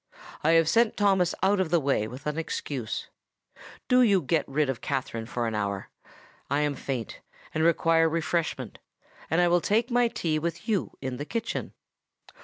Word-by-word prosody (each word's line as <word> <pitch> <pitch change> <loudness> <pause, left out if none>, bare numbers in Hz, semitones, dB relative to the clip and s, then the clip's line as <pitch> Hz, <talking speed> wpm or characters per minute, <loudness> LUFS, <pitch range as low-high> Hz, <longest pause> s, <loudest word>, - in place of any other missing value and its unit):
I 160 +2 +4
have 165 -1 +5
sent 230 +5 +3
Thomas 190 -4 +3
out 195 +1 +3
of 185 -4 +1
the 170 0 +3
way 135 -7 0
with 125 +5 -10
an 150 0 -1
excuse: 135 -7 -4 0.8
do 250 0 +5
you 205 -6 +5
get 160 +3 0
rid 145 +1 +1
of 135 -3 -3
Katherine 125 -5 -3
for 120 -1 -2
an 115 - -2
hour; 100 -2 -3 0.6
I 145 +1 +1
am 150 -1 +1
faint—and 135 +4 -5
require 165 0 +4
refreshment; 165 +1 -2 0.5
and 160 - +2
I 175 - +4
will 175 0 +3
take 225 +7 +1
my 245 0 +4
tea 160 -8 -1
with 170 +2 -4
you 210 -5 -1
in 130 -1 -3
the 145 - -5
kitchen." 230 +6 -3
160 Hz, 175 wpm, -27 LUFS, 135-185 Hz, 0.8 s, have